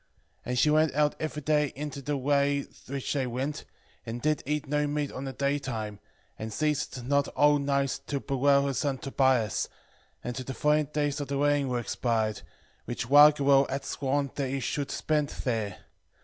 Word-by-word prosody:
And 125 0 -2
she 150 +5 +4
went 155 -2 +3
out 150 0 +3
every 155 -1 -4
day 150 -1 +2
into 145 0 -5
the 145 +1 -2
way 140 +1 +1 0.2
which 135 0 -3
they 135 -3 0
went, 130 +5 -3 0.4
and 115 +1 -5
did 155 +2 0
eat 150 0 -1
no 150 +1 +1
meat 145 -1 -2
on 130 - -6
the 135 - -3
daytime, 130 -7 -2 0.4
and 110 0 -5
ceased 150 -1 -1
not 140 +1 +2
whole 145 0 +5
nights 140 -1 0
to 140 - -1
bewail 140 +1 +2
her 140 - 0
son 135 0 -1
Tobias, 130 -5 +1 0.5
until 125 +1 -4
the 135 - -5
fourteen 150 0 +2
days 145 -1 -1
of 145 - -4
the 140 - -2
wedding 145 -1 +2
were 125 - 0
expired, 115 -2 -1 0.4
which 120 0 -4
Raguel 140 -2 +6
had 135 +1 -3
sworn 140 0 -1
that 140 -2 -2
he 135 +1 -2
should 140 +2 -2
spend 150 -2 0
there. 110 -6 -2
140 Hz, 175 wpm, -28 LUFS, 130-145 Hz, 0.5 s, Raguel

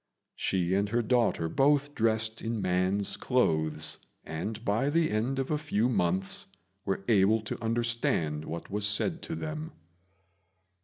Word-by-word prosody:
She 90 -1 0
and 100 +1 +1
her 120 +2 +1
daughter 115 -8 +1
both 145 - +2
dressed 110 -1 +1
in 115 0 -2
man's 95 +2 +1
clothes, 80 - +1 0.2
and 105 +8 -5
by 110 +7 +1
the 160 +1 +2
end 115 +5 0
of 135 +1 -2
a 150 - +1
few 125 -7 0
months 95 -4 0 0.4
were 95 0 -2
able 110 0 +4
to 110 +1 -6
understand 115 -10 0
what 85 +3 -6
was 105 +1 +1
said 135 - +1
to 165 - -4
them. 155 0 -5
110 Hz, 145 wpm, -29 LUFS, 95-125 Hz, 0.4 s, able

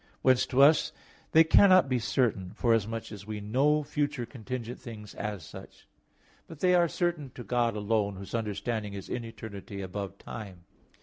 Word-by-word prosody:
Whence 130 -1 +4
to 135 +2 +4
us 150 +3 +5 0.4
they 160 - +7
cannot 185 0 +6
be 130 -2 +1
certain, 110 -6 0
forasmuch 115 -1 0
as 100 -1 -9
we 105 -1 -4
know 135 +9 +2
future 145 -3 -2
contingent 120 0 -6
things 110 -4 -9
as 105 -6 -5
such; - - -12 0.6
but 160 - -11
(they 180 +2 +3
are 175 -1 +5
certain) 170 -6 -1
to 120 - -7
God 120 -2 0
alone, 105 -1 0
whose 95 +1 -9
understanding 110 -1 -3
is 95 - -8
in 125 - -3
eternity 110 -2 -8
above 100 +1 -5
time. 95 -7 -9
115 Hz, 165 wpm, -29 LUFS, 105-135 Hz, 0.6 s, they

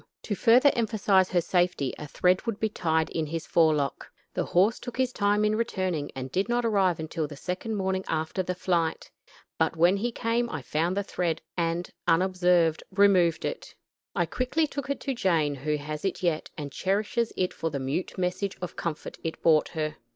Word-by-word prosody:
To 210 - -2
further 250 +7 +5
emphasize 205 -5 +2
her 180 -2 +2
safety 175 -6 +1
a 150 - -6
thread 180 +8 +1
would 225 -3 -2
be 220 - +1
tied 160 -5 0
in 160 -2 -2
his 165 +1 -4
forelock. 155 -4 +1 0.2
The - - -1
horse 195 +6 +3
took 245 -1 -8
his 255 -1 +1
time 205 +1 +2
in 210 0 +2
returning, 185 -9 -1
and 130 0 -5
did 190 - 0
not 240 0 +1
arrive 195 -6 +2
until 160 0 -3
the 145 - -9
second 185 +8 -3
morning 190 -1 -1
after 160 +3 -1
the 180 0 -3
flight, 170 -3 -1 0.5
but - - +2
when 175 +4 +4
he 235 +4 -1
came 235 +1 0
I 155 -4 -5
found 170 +7 -1
the 200 - +1
thread, 175 -4 -2
and, 170 0 -1 0.2
unobserved, 180 -2 +3
removed 190 -4 +3
it. - - -5 0.4
I - - +2
quickly 255 +6 0
took 280 -1 -5
it 280 - -1
to 275 - -2
Jane, 165 - +1
who 150 +2 -2
has 150 +1 -6
it 195 -1 -2
yet, 165 -3 0
and 145 -2 -5
cherishes 210 - 0
it 185 0 0
for 165 - -2
the 145 - -3
mute 135 +10 -3
message 185 +2 -2
of 180 - -6
comfort 165 -3 -5
it 165 - -4
brought 155 -2 +5
her. 155 -2 -3
180 Hz, 195 wpm, -27 LUFS, 160-205 Hz, 0.5 s, further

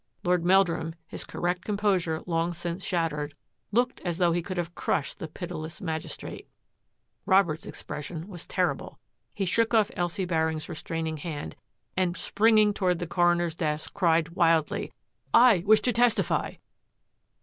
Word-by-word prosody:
Lord 180 -1 +2
Meldrum, 175 -3 +3
his - - -6
correct 180 +1 -2
composure 195 -6 0
long 170 0 0
since 175 +2 -4
shattered, 150 -4 -1 0.4
looked 245 +4 +1
as 175 -2 -2
though 175 -2 +3
he 175 +1 +1
could 185 +2 -6
have 175 0 -2
crushed 145 -4 -1
the 160 - -5
pitiless 165 0 -6
magis 160 -3 -4
trate. - - -9 0.8
Robert's 190 -5 +3
expression 160 +3 -6
was 175 -5 -9
terrible. - - -1 0.4
He 195 - -1
shook 230 +5 +2
off 220 +1 +3
Elsie 175 +2 -1
Baring's 160 -2 0
restraining 160 -1 -4
hand, 150 -1 -6 0.4
and 180 -1 0
springing 215 +3 +4
toward 180 -3 +1
the 175 - -3
coroner's 175 0 +2
desk, 155 -2 -3
cried 165 -4 +2
wildly, 165 -3 +1 0.3
" - - -38 0.2
I 195 - +3
wish 215 0 +6
to 245 - +1
testify 240 -1 +2
175 Hz, 150 wpm, -27 LUFS, 160-190 Hz, 0.8 s, wish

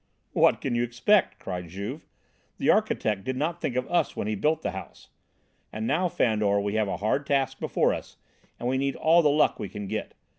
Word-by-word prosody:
"What - - +4
can 130 - -2
you 120 - +1
expect?" 120 - +2
cried 90 -2 -5
Juve. 100 - -6 0.5
"The - - +3
architect 105 -3 +1
did 130 0 -3
not 165 +5 -2
think 125 - -2
of 125 0 -1
us 175 - +1
when - - -3
he 110 - -1
built 155 +9 0
the - - -1
house. 95 - -10 0.6
And 110 +1 -4
now, 175 +8 +1
Fandor, 105 -7 +2
we 100 0 -2
have 110 -1 +1
a - - -2
hard 125 +7 0
task 135 -2 0
before - - +1
us - - -8 0.4
and 120 - -3
we 130 +1 +1
need 140 0 0
all 165 +2 +4
the 150 - +4
luck 150 +1 +3
we 100 - -4
can 105 -1 -6
get. - - -4
120 Hz, 215 wpm, -27 LUFS, 105-145 Hz, 0.6 s, What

